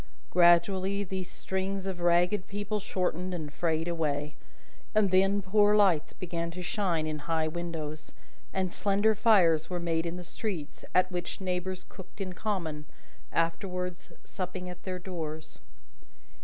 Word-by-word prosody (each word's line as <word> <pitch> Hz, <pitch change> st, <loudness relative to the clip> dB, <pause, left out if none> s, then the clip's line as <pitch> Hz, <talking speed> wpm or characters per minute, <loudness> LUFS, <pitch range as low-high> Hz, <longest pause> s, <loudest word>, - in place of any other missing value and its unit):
Gradually, 185 Hz, +3 st, +4 dB
these 190 Hz, -1 st, -4 dB
strings 190 Hz, 0 st, -2 dB
of 190 Hz, -2 st, -3 dB
ragged 175 Hz, +3 st, +3 dB
people 205 Hz, +1 st, -2 dB
shortened 185 Hz, -2 st, -1 dB
and 150 Hz, -4 st, -5 dB
frayed 165 Hz, 0 st, 0 dB
away; 150 Hz, -3 st, -1 dB, 0.6 s
and 210 Hz, -3 st, +4 dB
then 195 Hz, +2 st, +4 dB
poor 205 Hz, +2 st, +4 dB
lights 185 Hz, -7 st, +4 dB
began 170 Hz, -2 st, -3 dB
to 180 Hz, +2 st, -6 dB
shine 175 Hz, -4 st, 0 dB
in 155 Hz, -1 st, -2 dB
high 160 Hz, +1 st, 0 dB
windows, 155 Hz, -2 st, -5 dB, 0.4 s
and 185 Hz, -2 st, -1 dB
slender 205 Hz, +2 st, +3 dB
fires 190 Hz, -8 st, +4 dB
were 180 Hz, -1 st, -2 dB
made 165 Hz, -1 st, 0 dB
in 170 Hz, +1 st, -4 dB
the 180 Hz, -, -6 dB
streets, 175 Hz, -5 st, -5 dB
at 185 Hz, 0 st, +4 dB
which 175 Hz, -1 st, -3 dB
neighbours 185 Hz, 0 st, -2 dB
cooked 190 Hz, +2 st, -13 dB
in 185 Hz, -2 st, -3 dB
common, 170 Hz, -7 st, -3 dB, 0.5 s
afterwards 180 Hz, +2 st, -1 dB
supping 180 Hz, -1 st, -5 dB
at 180 Hz, -, -11 dB
their 185 Hz, -1 st, -2 dB
doors. 160 Hz, -4 st, -6 dB
180 Hz, 140 wpm, -30 LUFS, 165-190 Hz, 0.6 s, Gradually